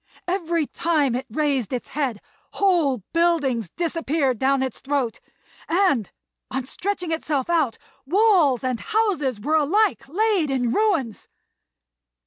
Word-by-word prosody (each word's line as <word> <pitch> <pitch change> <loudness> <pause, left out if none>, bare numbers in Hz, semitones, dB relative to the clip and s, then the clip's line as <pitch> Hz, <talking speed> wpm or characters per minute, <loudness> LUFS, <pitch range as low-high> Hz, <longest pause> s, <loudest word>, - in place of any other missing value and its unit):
Every 340 -3 0
time 300 -5 0
it 260 +2 -3
raised 275 -3 0
its 250 -2 -4
head, 265 -7 -2 0.3
whole 325 - +2
buildings 290 - +1
disappeared 315 - -1
down 270 0 +2
its 260 -3 -4
throat; 275 -5 -2 0.5
and, 335 - +2 0.4
on 260 -1 -3
stretching 360 +3 -3
itself 310 -2 -1
out, 305 -9 +1 0.3
walls 355 - +3
and 255 -2 -1
houses 395 - 0
were 305 +9 +1
alike 325 -2 +1
laid 395 -2 +1
in 250 -3 0
ruins. 330 - 0
295 Hz, 120 wpm, -23 LUFS, 260-345 Hz, 0.5 s, walls